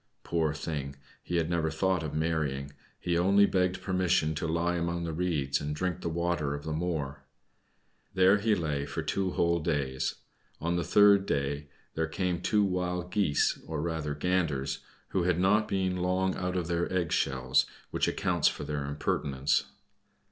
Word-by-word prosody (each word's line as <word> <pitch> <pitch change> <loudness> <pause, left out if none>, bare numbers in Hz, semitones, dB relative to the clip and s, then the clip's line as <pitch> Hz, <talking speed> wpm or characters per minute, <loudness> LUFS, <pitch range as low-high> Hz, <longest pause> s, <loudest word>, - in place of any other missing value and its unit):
Poor 80 -3 0
thing! 75 -2 -4 0.3
he 90 - -4
had 85 -2 +2
never 85 -2 0
thought 95 +2 +1
of 80 -2 -4
marrying; 75 -4 -1 0.3
he 85 - -1
only 100 +4 +5
begged 95 -1 0
permission 90 -4 +1
to 80 +1 -3
lie 85 +2 0
among 85 0 -1
the 85 -1 -3
reeds, 75 -6 0
and 75 0 -3
drink 90 +2 -2
the - - -2
water 85 -3 -1
of 70 - -7
the 80 - -3
moor. 75 -4 -2 0.9
There 95 +2 +5
he 110 +1 +2
lay 75 -5 -2
for - - -3
two 95 -1 0
whole 85 0 +2
days. 70 -5 -1 0.4
On 85 +2 -1
the 85 - 0
third 100 -1 +5
day 70 +1 -1 0.3
there 80 0 -1
came 90 +1 -1
two 105 +1 +2
Wild 90 -2 -1
Geese, 90 -8 +2
or 80 -1 -3
rather 75 -2 -2
Ganders, 75 -5 0 0.3
who 95 - 0
had 90 -1 +2
not 105 +4 +3
been 95 -1 0
long 90 +1 0
out 90 0 -2
of 90 - -1
their 85 0 -1
egg 90 -3 0
shells, 65 +1 +2 0.2
which - - +1
accounts - - +1
for - - -1
their 75 -2 -3
impertinence. 70 -1 0
85 Hz, 170 wpm, -29 LUFS, 75-90 Hz, 0.9 s, only